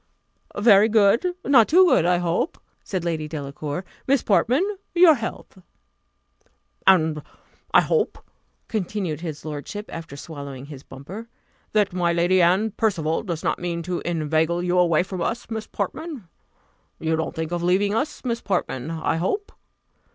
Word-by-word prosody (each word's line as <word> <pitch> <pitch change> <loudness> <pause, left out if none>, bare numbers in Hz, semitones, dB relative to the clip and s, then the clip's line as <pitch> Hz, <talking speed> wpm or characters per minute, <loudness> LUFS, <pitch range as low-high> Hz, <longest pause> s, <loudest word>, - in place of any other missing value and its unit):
"Very 205 0 +6
good 225 - +3
not 250 -6 +6
too 370 +4 +6
good, 175 - +4
I 180 0 +3
hope," 175 - -1 0.3
said 185 -3 -3
Lady 160 -3 -2
Delacour. 150 +2 -5 0.2
"Miss 275 -2 +3
Portman, 250 - +3 0.3
your 345 -2 +8
health." 230 -6 -6 1.3
"And 160 -5 +4 0.5
I - - +7
hope," 465 - 0 0.5
continued 190 -6 -3
his 160 -3 -6
lordship, 155 +7 -6
after 165 -4 -7
swallowing 140 -4 -8
his 140 -2 -10
bumper, 180 - -10 0.4
"that 210 -3 +2
my 175 -1 +1
Lady 175 +2 +3
Anne 190 +6 +3
Percival 170 -8 0
does 170 -6 -5
not - - 0
mean 170 -1 -3
to 180 +1 -3
inveigle 160 +1 0
you 180 0 +2
away 170 -1 +3
from 185 -1 -6
us, 230 +5 -3
Miss 220 -1 -4
Portman. 265 - -5 0.7
You 160 0 0
don't 160 +2 -3
think 160 0 -3
of 175 -1 -2
leaving 190 +4 +2
us, 275 +5 -2
Miss 235 -1 -1
Portman, 165 -8 -2
I 165 0 -1
hope? 395 - -2
180 Hz, 150 wpm, -23 LUFS, 160-215 Hz, 1.3 s, your